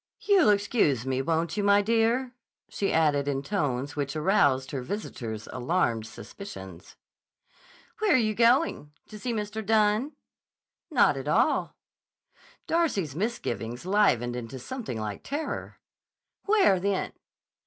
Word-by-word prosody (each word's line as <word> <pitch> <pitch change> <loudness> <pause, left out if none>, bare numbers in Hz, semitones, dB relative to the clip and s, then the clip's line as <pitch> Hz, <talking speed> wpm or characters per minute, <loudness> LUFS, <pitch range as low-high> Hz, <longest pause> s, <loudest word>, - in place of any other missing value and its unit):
"You'll 390 - +4
excuse 200 - +2
me, 130 0 0
won't 165 +4 -1
you, 205 - -1
my 200 0 +4
dear?" 230 +4 +1 0.3
she 200 - -2
added 150 -3 +2
in 140 -1 -1
tones 145 -6 -2
which 140 -1 -3
aroused 145 -6 +2
her 135 - -3
visitor's 120 - -5
alarmed 120 -5 0
suspicions. 95 - -10 1.0
"Where 430 -4 +3
are - - +6
you 215 -3 +1
going? 235 - +2 0.2
To 215 - -9
see 245 +4 -3
Mr. 215 0 -3
Dunne?" 215 +6 +2 0.8
"Not - - +3
at - - -6
all." - - +1 0.9
Darcy's 205 - 0
misgivings 125 - -3
livened 180 - +2
into 125 +1 -6
something 170 - -6
like 105 -2 -5
terror. 295 +3 -5 0.7
"Where, 400 - +4
then?" 195 +1 -1
190 Hz, 125 wpm, -27 LUFS, 130-220 Hz, 1.0 s, are